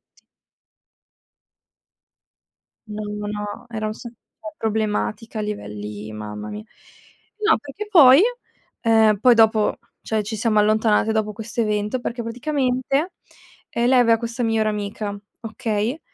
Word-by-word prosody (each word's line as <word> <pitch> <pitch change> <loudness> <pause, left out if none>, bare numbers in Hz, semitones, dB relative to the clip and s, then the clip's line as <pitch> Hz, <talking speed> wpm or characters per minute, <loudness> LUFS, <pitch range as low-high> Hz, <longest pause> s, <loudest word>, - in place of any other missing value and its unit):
tutti". - - -27 2.7
No, 210 0 -5
no, 210 0 -5
no, 210 0 -5
era 215 -2 -3
sa 235 +2 -9
cioè 280 +6 -13
problematica 220 0 -2
a - - 0
livelli 105 - -6
mamma 105 0 -7
mia. 105 0 -7 0.8
No, 435 - +5
perché 290 +9 -8
poi 290 -7 +8 0.6
ehm, 220 -2 +4
poi 245 +2 +6
dopo, 220 -1 +3 0.2
cioè, 215 -1 -1
ci 220 +2 -4
siamo 215 0 +2
allontanate 215 +1 +3
dopo 215 -1 -1
questo 220 +2 -4
evento, 210 +2 -1
perché 240 -1 -4
praticamente, 265 +5 -1 0.6
ehm, 235 +1 0
lei 255 0 +5
aveva 230 -2 +5
questa 235 +1 -4
migliore 225 -1 +1
amica, 205 0 -4 0.2
okay. 225 +3 -2
220 Hz, 125 wpm, -22 LUFS, 210-235 Hz, 2.7 s, poi